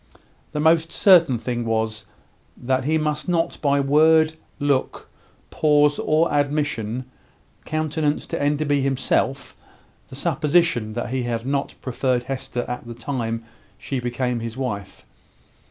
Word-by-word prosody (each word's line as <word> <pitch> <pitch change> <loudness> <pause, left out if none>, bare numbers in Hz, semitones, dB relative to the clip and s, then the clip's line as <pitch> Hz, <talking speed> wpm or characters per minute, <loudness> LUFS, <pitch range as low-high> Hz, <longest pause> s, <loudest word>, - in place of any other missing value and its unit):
The 150 - -3
most 160 +1 +3
certain 170 - +5
thing 120 +1 -3
was, 110 -2 -2 0.5
that 130 +1 -1
he 160 +2 +2
must 150 +2 -2
not 170 -2 0
by 140 -2 +2
word, 155 +3 +4 0.2
look, 140 -3 -1 0.4
pause, 150 -1 +3
or 155 +2 +2
admission, 140 -5 -1 0.6
countenance 155 -1 -1
to - - -4
Enderby 145 0 +1
himself 135 -1 0 0.5
the - - -11
supposition 150 -6 +1
that 120 +1 -3
he 130 0 -1
had 120 -1 -3
not 140 +1 -2
preferred 130 -1 0
Hester 125 -1 -4
at 125 -1 -5
the 120 - -7
time 115 -2 -3 0.3
she 135 - -4
became 125 0 -2
his 115 +1 -6
wife. 105 -7 -5
135 Hz, 130 wpm, -22 LUFS, 120-150 Hz, 0.6 s, certain